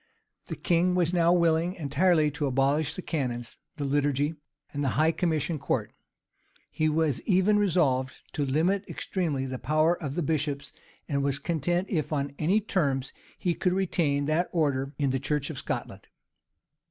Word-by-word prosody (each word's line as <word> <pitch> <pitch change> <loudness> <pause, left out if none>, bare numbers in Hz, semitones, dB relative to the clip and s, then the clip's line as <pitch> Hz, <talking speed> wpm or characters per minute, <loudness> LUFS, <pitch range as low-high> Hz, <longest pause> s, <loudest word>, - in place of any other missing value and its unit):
The - - -4
king 180 +1 +2
was 175 -1 +1
now 170 -1 +4
willing 170 0 +2
entirely 155 0 +2
to 145 0 -2
abolish 135 +3 +1
the 185 - -6
canons, 125 -6 -3 0.2
the 145 - -3
liturgy, 145 +1 +1 0.4
and 145 0 -2
the - - +1
high 155 +2 +4
commission 160 -2 -1
court. - - -2 0.8
He 155 0 +1
was 155 -4 +1
even 200 +2 +3
resolved 145 -10 +2 0.2
to 145 - -1
limit 165 +9 +1
extremely 155 -8 -2
the 130 -1 -5
power 155 +6 +2
of 140 -3 -4
the 175 - 0
bishops, 145 -2 -2 0.3
and 140 -2 0
was 140 -1 +1
content 175 +4 -1
if 160 -6 -2
on 140 -2 -1
any 185 +8 +3
terms 140 -10 -1 0.2
he 175 - 0
could 180 +1 0
retain 165 -7 +1
that 155 +4 +1
order 140 -5 0
in 140 -3 +1
the 135 - 0
church 145 +2 -1
of 140 - -5
Scotland. - - -5
155 Hz, 165 wpm, -27 LUFS, 140-175 Hz, 0.8 s, now